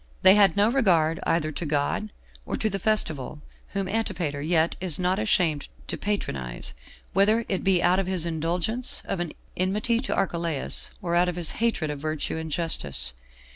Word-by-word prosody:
They 190 - +9
had 200 -3 +4
no 205 +2 +4
regard, 170 -11 +2
either 155 -2 0
to 155 - -6
God 150 +8 -1 0.3
or - - -4
to 215 - -1
the 195 - -3
festival, 160 -9 +3 0.3
whom 195 -1 -2
Antipater 180 -9 -2
yet 160 +1 +1
is 180 -5 +2
not 185 +2 0
ashamed 175 -9 0 0.2
to - - -4
patronize, 70 - -4 0.4
whether 215 +4 +3
it 190 - -2
be 190 -2 +3
out 180 +2 +3
of 195 - -2
his 185 -3 +3
indulgence 170 +9 -1
of 195 - -3
an 175 -3 -4 0.2
enmity 210 +5 0
to 260 - -3
Archelaus, 170 -6 +1
or 170 -1 -2
out 175 +1 +3
of 175 - -4
his 175 -3 +3
hatred 210 -10 0
of 145 - -6
virtue 155 +1 -3
and 160 0 -5
justice. 70 - +2
175 Hz, 175 wpm, -25 LUFS, 155-200 Hz, 0.4 s, They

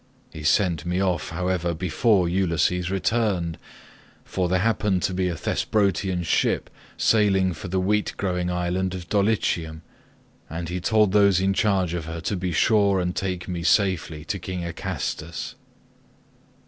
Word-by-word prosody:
He 80 - -8
sent 80 0 +2
me 90 +2 -1
off 95 -3 0
however 90 0 -1
before 90 +3 +2
Ulysses 90 0 +1
returned, 95 -3 0 0.7
for 90 -2 -1
there 95 - +2
happened 105 -4 +1
to 95 - 0
be 90 0 0
a 85 - -2
Thesprotian 95 0 0
ship 80 - 0 0.3
sailing 95 -4 +3
for 85 +4 -8
the 95 +1 0
wheat 105 +3 0
growing 90 -2 -1
island 90 +1 -1
of 90 -2 -7
Dulichium, 90 -6 0 0.7
and 85 +1 -5
he 90 +1 -3
told 105 +1 +3
those 100 -2 +4
in 95 +1 +2
charge 95 -4 +1
of 85 -2 -3
her 80 +1 -5
to 100 - -2
be 90 -1 -2
sure 100 +3 +3
and 90 0 -2
take 90 -2 -3
me 90 -2 -3
safely 85 -5 +1
to 95 +4 -3
King 90 0 -5
Acastus. 80 -1 -4
90 Hz, 150 wpm, -24 LUFS, 85-95 Hz, 0.7 s, those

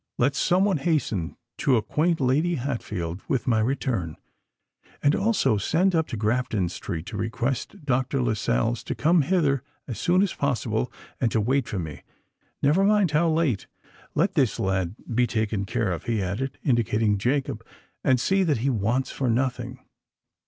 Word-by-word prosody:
Let 135 +4 +2
some 185 +6 +2
one 195 -5 +2
hasten 135 - -1 0.2
to 130 -4 +3
acquaint 160 +9 +1
Lady 150 +7 +2
Hatfield 105 - -4
with 130 -1 0
my 115 -5 +2
return; 115 - -1 0.9
and 145 - +4
also 195 - +2
send 175 - +2
up 160 -2 +1
to 115 - -5
Grafton 110 -3 0
Street 85 -2 -5
to - - -6
request 125 - -3
Dr. 130 +1 0
Lascelles 110 - 0
to - - -3
come 165 +2 +3
hither 145 -4 +2 0.3
as 120 - -5
soon 180 +2 +3
as 200 - -1
possible, 125 -4 -1 0.3
and 120 -3 +1
to 110 - +2
wait 130 +4 +1
for 105 - -3
me—never 140 - -3
mind 205 -4 +3
how 160 +3 +3
late. 155 - 0 0.5
Let - - +2
this - - +1
lad 95 -1 0 0.2
be 120 +1 +3
taken 110 -3 -1
care 115 -1 -1
of," 85 -2 -4
he 115 -2 0
added, 100 +9 -3
indicating 110 - +2
Jacob: 125 0 -1 0.4
"and 130 -2 +3
see 195 +9 +2
that 160 -8 +2
he 135 +5 0
wants 120 +4 0
for 130 -3 -1
nothing." 125 +1 -1
125 Hz, 160 wpm, -25 LUFS, 110-150 Hz, 0.9 s, and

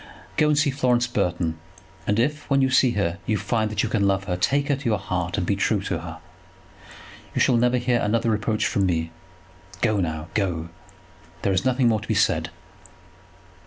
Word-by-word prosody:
Go 155 - +3
and 150 -1 +2
see 145 -1 +3
Florence 125 -3 +2
Burton; 90 -8 -1 0.5
and 105 - +1
if, 145 +5 -1
when 140 -1 +3
you 130 -1 +2
see 130 -1 +4
her, 95 -3 -1
you 110 - +1
find 110 0 -1
that 105 -2 -1
you - - 0
can 100 -3 +1
love 95 0 +1
her, 90 -2 -2
take 140 +10 +1
her 140 - +3
to 140 +1 -11
your 105 - +2
heart, 90 -2 -3
and 90 - 0
be 100 - +1
true 100 +1 +1
to 90 -4 -2
her. 80 0 -8 1.2
You - - +1
shall 125 - +4
never 125 +1 +3
hear 120 -1 +1
another 115 +2 +1
reproach 110 0 0
from 100 -2 +1
me. 80 -2 -1 0.7
Go 110 -3 +2
now, 80 -2 -3
go; 85 -5 -1 0.7
there 100 - +2
is 95 +5 0
nothing 130 -1 +2
more 110 -2 +2
to - - -10
be - - 0
said." - - +2
105 Hz, 200 wpm, -24 LUFS, 90-125 Hz, 1.2 s, see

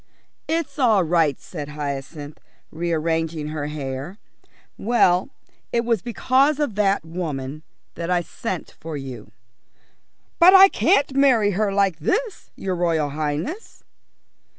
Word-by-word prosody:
"It's 325 -2 -2
all 220 -7 +4
right," 165 -4 +1
said 150 -5 -8
Hyacinth, 145 0 -6 0.3
rearranging 160 -1 -2
her 150 -1 -4
hair. 145 +4 -5 0.6
"Well, 195 -2 +2 0.4
it 235 0 0
was 230 -5 +1
because 265 +5 +2
of 290 -7 0
that 200 -3 +1
woman 155 -4 -5 0.3
that 170 +1 -5
I 180 -1 +2
sent 185 +1 -6
for 160 -1 -6
you." 135 -3 -8 1.1
"But 365 +2 +8
I 385 +1 +9
can't 285 -10 +2
marry 250 -7 +4
her 205 +1 0
like 195 -4 +1
this, 440 - -2
your 190 -1 -3
Royal 165 -4 0
Highness." 155 - -4
175 Hz, 125 wpm, -22 LUFS, 150-235 Hz, 1.1 s, I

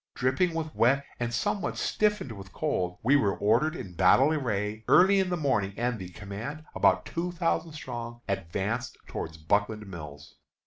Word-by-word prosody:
Dripping 130 +7 +1
with 160 -1 -3
wet 135 +4 +3
and 120 -1 -1
somewhat 190 - -1
stiffened 210 - 0
with 100 -2 -10
cold, 90 -1 -1
we 135 +5 +5
were 105 -9 +2
ordered 120 +10 +2
in 100 - -7
battle 110 - +5
array 110 -6 -2
early 195 +2 +6
in 190 -1 +1
the 180 - 0
morning, 105 - 0
and 120 -1 -1
the 90 -1 -7
command, 110 - -7
about - - +3
two 175 +1 -3
thousand 165 -1 -1
strong, 120 -5 -6
advanced 100 +5 -2
toward 80 0 -6
Buckland 105 +2 +1
Mills. 75 -6 -10
120 Hz, 165 wpm, -28 LUFS, 100-155 Hz, -, early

